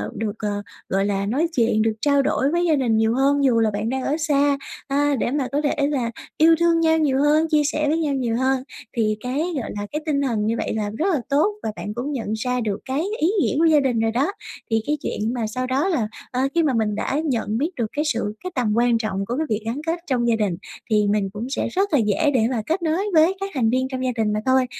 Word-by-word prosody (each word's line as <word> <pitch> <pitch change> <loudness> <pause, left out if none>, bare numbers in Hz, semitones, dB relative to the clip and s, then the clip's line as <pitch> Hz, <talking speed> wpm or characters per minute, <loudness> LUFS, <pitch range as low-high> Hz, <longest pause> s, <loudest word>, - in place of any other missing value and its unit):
được, 215 -1 -3
ờ, 205 -1 -2 0.3
gọi 195 +1 +1
là, 200 -1 -1
nói 270 +11 +1
chuyện, 225 -3 +2
được 220 0 +2
trao 280 -1 +3
đổi 275 +1 +1
với 345 +1 +1
gia 320 -3 +3
đình 240 -6 +1
nhiều 220 +1 +2
hơn 280 +2 +2
dù 245 -4 +4
là 220 -1 +2
bạn 210 +2 -2
đang 260 +1 -2
ở 290 +4 0
xa, 290 -3 +2 0.3
à, 285 +1 +2
để 240 - 0
mà 280 -3 0
có 290 +2 0
thể 290 -1 +1
là 250 -6 -1 0.3
yêu 325 +1 +6
thương 335 -1 +3
nhau 320 -1 +3
nhiều 290 -4 +2
hơn, 305 +2 +3
chia 305 -2 +3
sẻ 305 0 0
với 310 - +2
nhau 305 -4 0
nhiều 240 -4 -1
hơn. 260 0 +1 0.3
Thì 215 -2 +1
cái, 250 +4 -3 0.2
gọi - - -6
là, 205 0 -4
cái 300 - -3
tinh 285 -2 +1
thần 230 -6 0
như 225 +2 +1
vậy - - -2
là 210 -1 -1
rất 325 - 0
là 290 - 0
tốt 300 +9 +2
và 220 - -2
bạn 210 - -5
cũng 255 +6 -4
nhận 225 -6 -3
ra 250 +3 -1
được 205 -3 -2
cái 270 +4 -1 0.2
ý 320 - +3
nghĩa - - 0
của 330 - +4
gia 315 -2 +5
đình 255 -5 +1
rồi 225 0 +1
đó. 275 - +1 0.4
Thì 225 0 +2
cái 300 - +1
chuyện 220 +3 -2
mà 235 -3 -2
sau 255 +4 -3
đó 270 +8 +1
là, 265 - 0 0.2
ờ, 255 - -1
khi 335 - +4
mà 290 -4 +2
mình 215 -3 0
đã 270 +6 -1
nhận 225 -6 -1
biết 295 +7 0
được 235 - -1
cái 300 +1 0
sự 230 -7 -1
cái 365 - -4
tầm 235 -5 +1
quan 240 0 +3
trọng 195 -3 -2
của 240 +6 -3
cái 315 - 0
việc 215 0 0
gắn 240 +6 -3
kết 335 +1 0
trong 245 -3 +1
gia 230 - +3
đình, 205 -6 -1 0.3
thì 210 -2 +3
mình 205 -1 +1
cũng 230 +5 -5
sẽ 280 - -1
rất 390 -1 0
là 280 - +5
dễ 230 +8 +2
để 225 -4 +3
mà 235 -4 -1
kết 330 +6 -1
nối 335 +5 0
với 325 +4 +5
các 390 0 -3
thành 240 -5 +1
viên 260 +2 +1
trong 260 -1 -4
gia 250 - +1
đình 220 -2 0
mà 210 - 0
thôi. 260 0 +3
260 Hz, 275 wpm, -22 LUFS, 225-295 Hz, 0.4 s, yêu